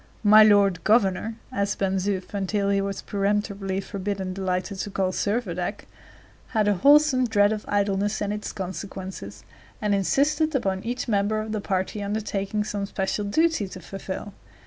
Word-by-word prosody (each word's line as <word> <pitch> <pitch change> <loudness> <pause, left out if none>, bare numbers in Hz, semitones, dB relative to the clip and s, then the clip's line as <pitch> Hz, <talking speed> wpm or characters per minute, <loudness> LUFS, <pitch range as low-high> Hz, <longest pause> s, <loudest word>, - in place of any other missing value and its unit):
"My 215 +1 +8
lord 200 -4 +5
governor," 215 0 +2 0.2
as 200 0 -1
Ben 195 -1 0
Zoof 190 0 -2
until 200 0 0
he 200 0 +2
was 195 0 -4
peremptorily 200 -1 -1
forbidden 195 -1 -4
delighted 190 +1 -2
to 205 - -3
call 190 -1 0
Servadac, 200 -3 -2 0.7
had 210 -1 +3
a 205 - +4
wholesome 280 +3 +5
dread 205 -1 +3
of 215 - -5
idleness 205 +1 0
and 205 0 -1
its 210 0 -5
consequences, 190 - -7 0.4
and 210 -1 0
insisted 290 - +1
upon 190 -7 -1
each 245 +3 -3
member 210 0 +1
of 215 0 -4
the 215 -1 -2
party 190 +1 -2
undertaking 205 0 -2
some 205 -1 -3
special 195 +1 -2
duty 315 0 +1
to 185 - -9
fulfill. 195 +2 -7
200 Hz, 155 wpm, -25 LUFS, 190-215 Hz, 0.7 s, My